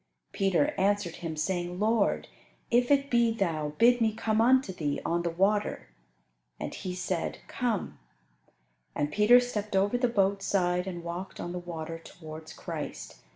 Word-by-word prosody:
Peter 195 - +2
answered 200 -3 +1
Him, 165 -2 -5
saying, 175 +2 -2
"Lord, 220 0 +2 0.4
if 245 +1 +3
it 280 -1 +3
be 235 -1 +4
Thou, 160 -9 -1
bid 245 +1 +5
me 220 -1 +3
come 220 -1 +1
unto 255 -3 +4
Thee 150 -5 -2
on 170 +1 +1
the 170 - -1
water." 195 - 0 0.7
And - - -4
He 180 -1 -5
said, 180 -2 -2
"Come," 235 -6 -2 1.0
and 145 0 -1
Peter 215 +7 +6
stepped 215 -5 -3
over 205 +5 +2
the 245 - +3
boat's 195 -3 +1
side 180 -1 +1
and 175 -2 -5
walked 175 +3 -6
on 175 - -4
the 180 - -4
water 165 -2 -6
towards 160 -1 -10
Christ. - - -6
195 Hz, 155 wpm, -29 LUFS, 170-225 Hz, 1.0 s, Peter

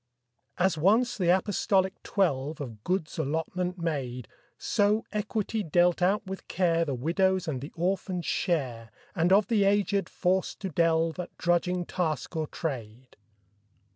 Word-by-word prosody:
As 180 -3 +2
once 225 +8 +3
the 180 -4 0
apostolic 190 +1 +2
twelve 155 -6 0
Of 115 -7 -7
goods 180 -4 -2
allotment 175 +5 -2
made, 135 - -3 0.3
So 210 +2 +1
equity 215 +1 -2
dealt 175 0 +2
out 195 +4 +2
with 190 0 -7
care 170 -2 +1
The 140 -4 -2
widow's 180 +7 +1
and 135 -5 -2
the 145 - -7
orphan's 180 0 -1
share, 125 - -1 0.2
And 175 -1 +1
of 200 +2 +6
the 215 -4 +2
aged 200 -2 +2
forced 185 +1 0
to 195 - -3
delve 165 0 +1
At 180 - -6
drudging 175 +1 +1
task 170 -2 -2
or 160 -1 -1
trade. 125 -6 -6
175 Hz, 140 wpm, -28 LUFS, 155-190 Hz, 0.3 s, of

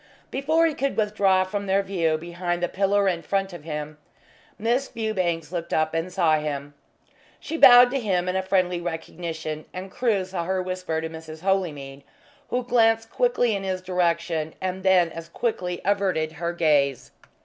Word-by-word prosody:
Before 315 +5 +2
he 320 - +1
could 275 -1 -2
withdraw 200 -3 +3
from 200 +1 -4
their 195 +1 +2
view 165 -5 0
behind 175 +1 -3
the - - +2
pillar 200 +2 +1
in 175 -3 0
front 195 0 -1
of 170 -4 -9
him, 150 -1 -5 0.6
Miss 240 +5 0
Fewbanks 185 -8 -2
looked 170 -2 -3
up 155 0 +1
and 165 +3 -2
saw 165 -4 +2
him. 145 -1 -4 0.7
She 325 - -5
bowed 245 -5 +8
to 275 - 0
him 185 -6 0
in 185 +1 0
friendly 185 -2 0
recognition, 160 -2 -5
and 185 +1 -7
Crewe 215 -6 0
saw 185 -2 -4
her 190 +1 0
whisper 185 -3 -3
to 160 - -3
Mrs. 160 -1 -9
Holymead, 155 -8 -2 0.5
who 250 0 -1
glanced 225 -2 +2
quickly 245 - +2
in 195 - -4
his 190 -1 -2
direction 170 -3 -1
and 185 0 -3
then 185 -3 +4
as 165 0 -8
quickly 180 -4 -2
averted 190 -6 +1
her 170 +2 -3
gaze. 145 -6 +1
185 Hz, 170 wpm, -24 LUFS, 165-200 Hz, 0.7 s, bowed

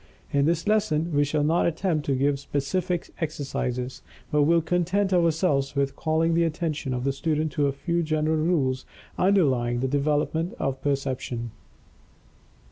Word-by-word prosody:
In 140 0 +2
this 165 +2 0
lesson 175 -7 +1
we 145 0 +4
shall 145 +1 0
not 160 +4 +2
attempt 165 -2 -1
to 135 - +2
give 140 +1 +1
specific 165 +6 -2
exercises, 130 -4 -3 0.3
but 150 - +3
will 165 +3 +4
content 180 +4 0
ourselves 160 -5 +2
with 140 -1 0
calling 160 +1 +1
the 170 +1 +3
attention 160 -4 -2
of 125 - -3
the 135 +1 0
student 155 +2 -1
to 145 -2 +1
a - - +1
few 170 +5 -1
general 155 0 0
rules 145 -6 +1 0.4
underlying 130 -11 +2
the 130 - 0
development 150 +4 0
of 135 -1 -2
Perception. 130 -4 -2
150 Hz, 150 wpm, -25 LUFS, 140-170 Hz, 0.4 s, we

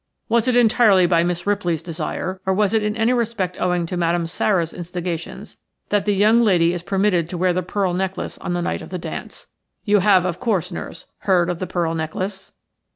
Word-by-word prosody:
Was 235 +1 +2
it 250 - +2
entirely 220 -5 +5
by 170 -1 +3
Miss 175 0 -2
Ripley's 175 -6 0
desire, 175 +3 -4
or 190 - +2
was 205 0 +2
it 220 - +3
in 210 +1 -2
any 225 +2 +2
respect 225 -7 -2
owing 180 -1 +1
to 175 - -5
Madame 170 0 0
Sara's 170 0 0
instigations, 175 -1 -6 0.3
that 205 -2 +1
the 205 -1 +2
young 215 +4 +4
lady 175 -6 +3
is 175 - -4
permitted 190 -3 +1
to 180 - -5
wear 180 +1 +2
the 185 - 0
pearl 185 0 -1
necklace 190 +1 -3
on 175 - -3
the 175 0 -1
night - - -2
of - - -10
the 185 - -4
dance? 170 - -7 0.4
You 205 -1 +4
have, 190 -2 +4
of 175 -2 -2
course, 195 -7 -1
nurse, 170 - -7
heard 180 -3 +2
of 175 - -5
the 185 - -3
pearl 170 -2 -1
necklace?" 185 +5 -4
185 Hz, 210 wpm, -21 LUFS, 175-205 Hz, 0.4 s, entirely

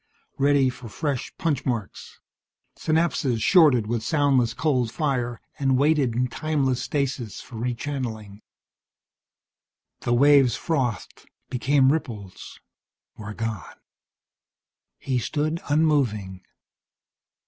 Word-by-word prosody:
Ready 140 -2 +3
for 125 -2 -11
fresh 140 0 -3
punch 155 -6 -1
marks. 115 -7 -5 0.6
Synapses 155 -6 0
shorted 150 - +5
with 115 +1 -2
soundless 130 -3 +2
cold 130 -7 0
fire, 125 -6 -2 0.2
and 135 -2 +2
waited 140 -4 +2
in 125 +1 +1
timeless 135 -2 -1
stasis 130 -5 -3
for 115 - -10
rechannelling. 115 -4 -4 1.6
The 120 - -1
waves 140 -1 +5
frothed, 125 - -3 0.2
became 135 +2 +3
ripples, 110 -12 -6 0.6
were 105 0 -8
gone. 115 -7 -5 1.2
He 130 -2 -1
stood 155 +7 -2
unmoving. 130 - +1
130 Hz, 95 wpm, -24 LUFS, 115-145 Hz, 1.6 s, shorted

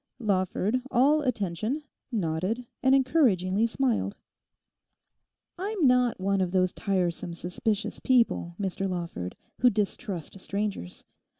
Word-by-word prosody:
Lawford, 205 +2 0
all 285 +5 +4
attention, 230 - -1 0.3
nodded, 195 +4 -1 0.2
and 260 +1 +5
encouragingly 230 - +3
smiled. 235 -4 0 1.4
'I'm 395 -3 0
not 250 -4 +4
one 195 +1 +1
of 180 -2 0
those 185 -1 +2
tiresome, 175 -3 -1
suspicious 200 +5 -2
people, 230 -9 +2
Mr 195 0 -1
Lawford, 170 - -4 0.2
who 250 - +6
distrust 200 - -3
strangers. 200 - -4
205 Hz, 105 wpm, -28 LUFS, 185-250 Hz, 1.4 s, who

